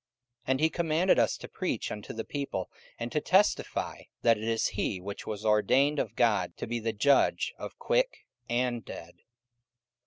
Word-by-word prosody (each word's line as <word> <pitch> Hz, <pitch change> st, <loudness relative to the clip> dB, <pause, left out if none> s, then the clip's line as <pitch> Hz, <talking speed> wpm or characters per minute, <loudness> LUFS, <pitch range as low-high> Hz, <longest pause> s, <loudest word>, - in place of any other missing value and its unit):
44:010:042 -, -, -62 dB
And 130 Hz, 0 st, +2 dB
he 160 Hz, -, +5 dB
commanded 170 Hz, -1 st, +2 dB
us 115 Hz, -, +2 dB
to -, -, -9 dB
preach -, -, -3 dB
unto 105 Hz, -1 st, -6 dB
the 110 Hz, 0 st, -5 dB
people, 140 Hz, -10 st, -4 dB, 0.3 s
and 120 Hz, 0 st, -4 dB
to 150 Hz, -, 0 dB
testify 190 Hz, +7 st, +1 dB, 0.2 s
that 115 Hz, -1 st, +6 dB
it 110 Hz, 0 st, -6 dB
is 115 Hz, -1 st, +1 dB
he 95 Hz, -, -2 dB
which 100 Hz, +3 st, -7 dB
was 105 Hz, 0 st, -5 dB
ordained 130 Hz, +8 st, +3 dB
of -, -, -2 dB
God 105 Hz, -8 st, +2 dB
to -, -, -4 dB
be 120 Hz, +1 st, -2 dB
the 115 Hz, 0 st, -1 dB
Judge 135 Hz, +6 st, +3 dB
of -, -, -7 dB
quick -, -, 0 dB, 0.2 s
and 120 Hz, -1 st, 0 dB
dead. 85 Hz, -1 st, -9 dB
120 Hz, 180 wpm, -29 LUFS, 105-145 Hz, 0.3 s, that